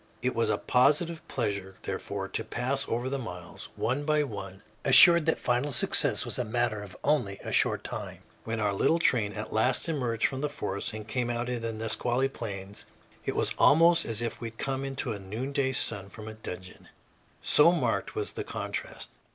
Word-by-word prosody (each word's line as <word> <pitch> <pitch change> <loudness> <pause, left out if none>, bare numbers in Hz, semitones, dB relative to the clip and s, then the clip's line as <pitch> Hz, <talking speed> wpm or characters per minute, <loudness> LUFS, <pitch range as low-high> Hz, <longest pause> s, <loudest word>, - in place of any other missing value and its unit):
It - - +1
was - - +1
a - - +2
positive 150 +6 +2
pleasure, 100 -5 -3
therefore, - - -4
to - - -2
pass 135 +3 -2
over 120 +2 -1
the 135 +1 -2
miles, 90 -8 -8
one 130 +5 -1
by 150 0 +2
one, 100 -6 -7 0.2
assured 170 -2 +8
that 160 - +3
final 125 +4 0
success - - +2
was - - -3
a - - +1
matter 115 -2 -1
of 100 -2 -10
only 125 -10 +1
a - - -16
very - - -5
short - - +2
time. - - -7 0.2
When 115 0 -3
our 105 -1 +1
little 160 +11 +3
train 115 -10 +2
at 105 +1 -6
last 125 +8 +3
emerged 125 -8 0
from 135 -1 -1
the 150 - -1
forests 100 -7 -3
and 110 0 -7
came 120 +1 -1
out 120 +1 -2
into 125 -1 -2
the 115 0 -2
Nisqually 120 +4 0
plains, 100 -5 -7 0.4
it - - -2
was - - +1
almost 165 +3 +6
as 115 0 -2
if 115 - -4
we 115 - -3
had 115 0 -11
come 135 0 -2
into 135 -2 -3
a 100 - -6
noonday 130 +8 -2
sun 100 -6 0
from 110 +1 -10
a 110 - -6
dungeon, 95 -4 -9 0.5
so 150 +3 +6
marked 175 - -1
was 425 0 -3
the - - -5
contrast. - - -5
120 Hz, 200 wpm, -28 LUFS, 105-140 Hz, 0.5 s, assured